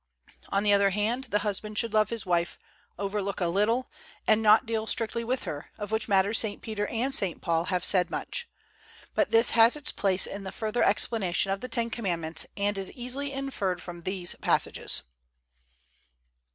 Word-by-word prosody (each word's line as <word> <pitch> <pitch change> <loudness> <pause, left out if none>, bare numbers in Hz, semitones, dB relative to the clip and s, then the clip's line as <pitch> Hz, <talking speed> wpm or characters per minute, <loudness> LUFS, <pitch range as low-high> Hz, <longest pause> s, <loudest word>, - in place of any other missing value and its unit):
On 200 +1 0
the 205 -1 +4
other 200 0 +4
hand, 215 +6 -1
the 220 -4 0
husband 210 +1 -4
should 230 -1 +1
love 215 -1 +3
his 230 -2 -4
wife, 175 -1 0 0.4
overlook 200 0 -3
a 180 - +1
little, 215 +8 +1 0.4
and 215 0 +3
not 215 +3 +5
deal 220 -1 -2
strictly 230 0 0
with 250 +3 -2
her, 145 -1 -6
of 210 -1 -6
which 220 0 0
matter 200 +1 +3
St. 220 -2 +2
Peter 210 -2 -3
and 250 +4 -1
St. 190 -9 0
Paul 165 0 0
have 180 -2 -1
said 185 -2 +3
much. 485 -1 -4 0.6
But - - +1
this 230 +1 +6
has 230 +3 +6
its 295 -2 -3
place 190 -2 +1
in 200 0 -5
the 190 - -6
further 220 +1 -2
explanation 195 -3 +3
of 195 - -2
the 255 - -5
Ten 230 0 0
Commandments, 170 -8 -1
and 200 0 0
is 190 - +2
easily 265 +3 -2
inferred 270 -10 -3
from 175 -1 -8
these 185 0 -2
passages. - - +1
210 Hz, 180 wpm, -27 LUFS, 190-230 Hz, 0.6 s, this